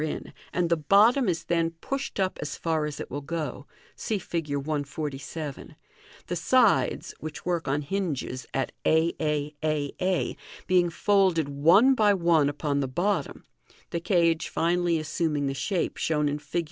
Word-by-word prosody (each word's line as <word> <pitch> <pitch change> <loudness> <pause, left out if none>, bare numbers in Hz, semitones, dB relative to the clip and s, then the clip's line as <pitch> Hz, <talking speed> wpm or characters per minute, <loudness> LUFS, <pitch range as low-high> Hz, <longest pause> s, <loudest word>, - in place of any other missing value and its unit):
in, 155 - -4 0.2
and 175 -2 0
the - - +6
bottom 205 - +4
is 165 -1 -1
then 170 -1 +1
pushed 275 -1 -4
up 190 -1 0
as 150 0 -4
far 160 -2 0
as 150 -1 -6
it - - -7
will 145 +3 -4
go 145 -2 -4 0.3
(see 220 - -2
Fig. 170 -4 -4
147), 145 0 -4 0.5
the - - -3
sides, - - +2
which 155 -1 -7
work 175 -4 -1
on 145 +2 0
hinges 150 -7 -3
at 135 - -1
a 160 +1 +3
a 150 -1 -1
a 150 -2 0
a, 185 -1 0 0.3
being 180 -1 +3
folded 185 -3 +2
one 170 - +5
by 210 -5 +4
one 170 -5 +3
upon 145 0 -1
the 135 - 0
bottom, 180 +10 -1 0.5
the 170 - -1
cage 170 -2 +2
finally 170 0 +1
assuming 155 -1 -1
the 135 - -1
shape 170 +8 -2
shown 150 -2 +1
in 145 +1 -1
Fig. 145 +4 -3
160 Hz, 160 wpm, -27 LUFS, 145-180 Hz, 0.5 s, the